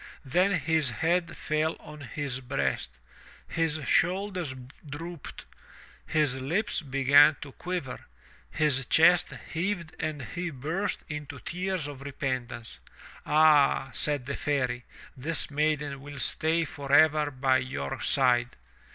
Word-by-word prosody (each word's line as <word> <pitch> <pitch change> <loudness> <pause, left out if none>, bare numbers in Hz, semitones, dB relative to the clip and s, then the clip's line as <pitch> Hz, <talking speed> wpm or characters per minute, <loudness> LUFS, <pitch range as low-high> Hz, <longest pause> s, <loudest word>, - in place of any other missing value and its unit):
Then 180 +9 +2
his 160 -4 +1
head 170 +6 0
fell 155 +1 0
on 150 0 -11
his 135 0 -4
breast, 65 - -2 0.5
his 160 -1 -1
shoulders 180 -6 +1 0.3
drooped, 165 +2 -8 0.6
his 145 -5 +1
lips 185 - 0
began 140 +1 +5
to 140 - -8
quiver, 175 -4 -5 0.4
his 140 - +1
chest 175 +2 +5 0.2
heaved 170 -1 -2
and 155 -3 -3
he 175 +8 -4
burst 160 +8 -3
into 150 -2 -6
tears 180 0 -3
of 145 -2 -7
repentance. 130 -4 -4 0.5
"Ah," 150 -3 +4
said 145 -4 0
the 140 - -3
Fairy, 125 -4 -1 0.3
"this 150 +4 -3
maiden 150 -2 0
will 145 0 -9
stay 160 +5 +1
forever 145 +1 +3
by 130 -1 +2
your 70 - -4
side. 120 -2 +2
150 Hz, 115 wpm, -28 LUFS, 135-165 Hz, 0.6 s, began